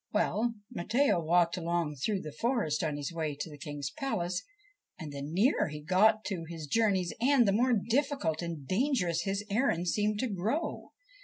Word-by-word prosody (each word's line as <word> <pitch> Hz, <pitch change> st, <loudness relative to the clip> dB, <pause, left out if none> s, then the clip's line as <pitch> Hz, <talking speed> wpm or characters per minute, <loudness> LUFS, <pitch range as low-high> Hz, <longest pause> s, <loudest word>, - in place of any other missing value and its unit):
Well, 220 Hz, +2 st, +1 dB, 0.2 s
Matteo 240 Hz, +2 st, +2 dB
walked 170 Hz, +2 st, +3 dB
along 170 Hz, -3 st, -1 dB
through 195 Hz, +8 st, -1 dB
the 155 Hz, -, -7 dB
forest 210 Hz, -, 0 dB
on 150 Hz, -2 st, -1 dB
his 145 Hz, +3 st, -4 dB
way 155 Hz, -3 st, -2 dB
to 145 Hz, +2 st, -5 dB
the 145 Hz, -, -10 dB
King's 145 Hz, -2 st, -5 dB
palace, 180 Hz, -, -2 dB, 0.6 s
and 155 Hz, -4 st, -7 dB
the 140 Hz, -1 st, -6 dB
nearer 185 Hz, -, +2 dB
he 150 Hz, -1 st, -6 dB
got 210 Hz, +7 st, +3 dB
to 185 Hz, -5 st, -3 dB
his 165 Hz, -2 st, -6 dB
journey's 190 Hz, 0 st, +1 dB
end 255 Hz, -2 st, +5 dB
the -, -, +4 dB
more 245 Hz, +5 st, +3 dB
difficult 235 Hz, -, 0 dB
and 165 Hz, -5 st, -5 dB
dangerous 190 Hz, -, +1 dB
his 200 Hz, +1 st, -2 dB
errand 200 Hz, -7 st, +1 dB
seemed 210 Hz, +2 st, +1 dB
to 260 Hz, -, 0 dB
grow. 220 Hz, -, -2 dB
185 Hz, 175 wpm, -31 LUFS, 160-225 Hz, 0.6 s, end